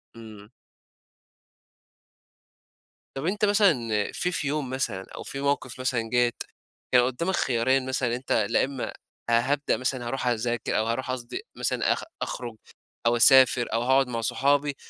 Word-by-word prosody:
إمم. 110 -2 -12 2.7
طب 135 - -4
أنت 205 +4 +1
مثلًا 205 -3 +4 0.4
في 180 - -1
في 145 - -2
يوم 145 -2 -2
مثلًا 115 -7 -3
أو - - -7
في 135 - -6
موقف 130 -3 -1
مثلًا 120 -3 -1
جات، 120 0 +1 0.5
كان 125 - +6
قدّامك 170 +9 -1
خيارين 130 +2 +1
مثلًا 130 -1 -1
إن - - -2
أنت 125 +2 -5 0.2
لا - - +3
امّا 135 -2 -5 0.4
هابدأ 135 +5 +1
مثلًا 130 -1 -2
هاروح 130 +1 -3
أذاك 120 0 -1
أو 110 - +1
هاروح 130 +2 -2
قصدي 125 - -5
مثلًا - - 0
أخ - - -6 0.2
أخرج 120 -3 -5 0.5
أو 120 - +4
أسافر 130 -1 +5
أو 115 - +1
هاقعد 130 +2 +3
مع 115 -2 -3
صحابي، 140 +4 +1
130 Hz, 150 wpm, -26 LUFS, 120-135 Hz, 2.7 s, كان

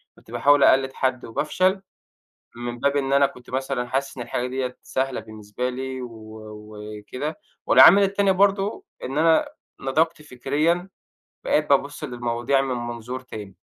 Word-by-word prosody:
كنت 115 - -18
باحاول 140 +4 +4
أقلِّد 135 0 +4
حد 130 -1 -1
وبافشل، 185 - 0 0.8
من 120 0 -5
باب 140 0 +1
إن 135 -1 0
أنا 140 0 +5
كنت 125 -2 -14
مثلًا 130 -1 -2
حاسس 135 +2 -2
إن 120 - -4
الحاجة 125 - -2
ديَّة 130 -1 -3
سهلة 130 0 -2
بالنسبة 110 +3 -5
لي 130 0 -5
و 125 - -6 0.4
وكده 105 +7 -7 0.3
والعامل 200 +4 +8
التاني 200 0 +2
برضه 200 - +1 0.2
إن 135 +3 -3
أنا 160 0 +4 0.3
نضجت 155 +3 0
فكريًا، 150 +7 -1 0.6
بقيت - - +1
بابُصّ - - +1
للمواضيع 120 +2 0
من 130 -2 -2
منظور 120 +1 -5
تاني. 105 -6 -9
130 Hz, 145 wpm, -23 LUFS, 120-150 Hz, 0.8 s, والعامل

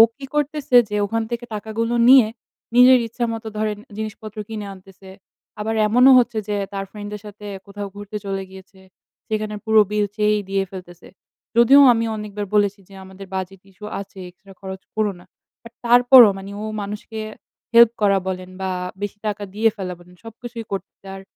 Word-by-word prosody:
কি 275 - -9
করতেছে? 295 -3 -1
যে 210 - -3
ওখান 225 +2 -2
থেকে 235 0 -4
টাকাগুলো 225 +3 -3
নিয়ে, 260 -5 +8 0.5
নিজের 250 +1 +7
ইচ্ছা 235 +2 -3
মতো 225 0 -7
ধরেন 215 -1 -1 0.2
জিনিসপত্র 215 0 -7
কিনে 215 -2 -6
আনতেছে। 190 0 -16 0.5
আবার 220 +1 -2
এমনও 250 +5 +6
হচ্ছে 240 -2 -1
যে, 210 - -1 0.2
তার 195 0 -3
ফ্রেন্ড 205 -1 -8
দের 210 - -7
সাথে 210 0 -11 0.2
কোথাও 200 0 -6
ঘুরতে 205 +1 -7
চলে 195 -1 -3
গিয়েছে। 190 0 -15 0.5
সেখানে 215 -1 -3
পুরো 220 -1 +5
বিল 210 -1 +1
সেই 210 0 +2
দিয়ে 195 0 0
ফেলতেছে। 175 -2 -11 0.5
যদিও 270 +4 +7
আমি 230 0 -1
অনেকবার 210 -1 -5
বলেছি 205 0 +2
যে, - - -16
"আমাদের 190 +1 -11
বাজেট 190 0 -5
ইস্যু 210 +2 -12
আছে, 195 -1 -10
এক্সট্রা 195 +2 -18
খরচ 190 0 -7
কোরো 215 -2 +1
না।" 175 - -17 0.4
বাট 230 0 -13
তারপরও 245 0 +8
মানে 195 +1 -9
ও - - -5 0.2
মানুষকে 210 +2 -7 0.5
হেল্প 235 -1 +8
করা 200 -1 +4
বলেন 185 0 -4
বা 190 - -2 0.3
বেশি 205 0 -4
টাকা 205 0 -3
দিয়ে 220 +2 +3
ফেলা 185 -3 -5
বলেন, 180 +1 -18
সবকিছুই 230 0 -9
করতে 195 -1 -5 0.2
আর 195 - -9
210 Hz, 175 wpm, -21 LUFS, 195-225 Hz, 0.5 s, নিয়ে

